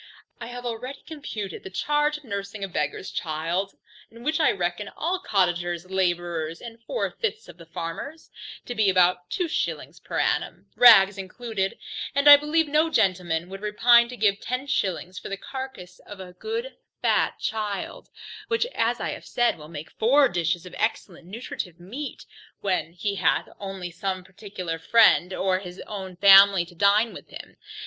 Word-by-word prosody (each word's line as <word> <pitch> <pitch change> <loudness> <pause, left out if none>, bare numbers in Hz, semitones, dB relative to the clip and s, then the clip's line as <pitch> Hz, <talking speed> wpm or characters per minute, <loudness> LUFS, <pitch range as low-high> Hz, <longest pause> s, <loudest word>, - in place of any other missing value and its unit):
I 235 - -7
have 245 0 -8
already 250 +4 -5
computed 220 - -6
the - - -9
charge 295 - 0
of 300 - -17
nursing 200 -3 -5
a - - -2
beggar's 185 +1 -3
child 170 +4 -2 0.3
(in 230 +1 -14
which 310 +4 0
list 310 - +4
I - - +4
reckon 175 +2 -3
all 360 +4 -1
cottagers, 175 - 0
labourers, 175 -3 -1
and 230 -1 -10
four - - -2
fifths 440 -1 -4
of - - -13
the 165 -2 -14
farmers) 165 - -7 0.3
to 245 - -4
be 215 -4 +2
about 180 -1 +3
two 360 - -1
shillings - - -3
per - - -6
annum, - - -1
rags 200 -5 +7
included; 195 0 -3 0.4
and 280 +1 +2
I 290 - +13
believe 300 +2 +1
no 305 +2 +2
gentleman 180 - +1
would 195 +1 -8
repine 235 +3 +5
to 250 - -8
give 200 -1 +2
ten 255 +2 -3
shillings 190 -8 -2
for - - -8
the 195 - -4
carcass 260 -9 -8
of 205 -2 -12
a 180 -1 -9
good 455 - -5 0.3
fat - - +2
child, 210 -2 -4 0.4
which, 460 0 +1
as - - 0
I - - -2
have - - -7
said, 240 -1 +1
will 150 -1 -12
make 155 -1 -8
four 275 +5 +4
dishes 175 0 -1
of 180 - -11
excellent 185 -6 -2
nutritive 185 -4 -6
meat, 245 +12 -7 0.4
when 185 -4 -1
he 200 +3 -3
hath - - +1
only 195 -3 -6
some 185 +1 -3
particular 185 -3 -6
friend, 200 -1 +5
or 185 0 0
his 180 -1 -10
own 190 -3 -7
family 195 -1 +7
to 175 - -16
dine 205 +5 +3
with - - -11
him. - - -10
200 Hz, 175 wpm, -25 LUFS, 180-245 Hz, 0.4 s, I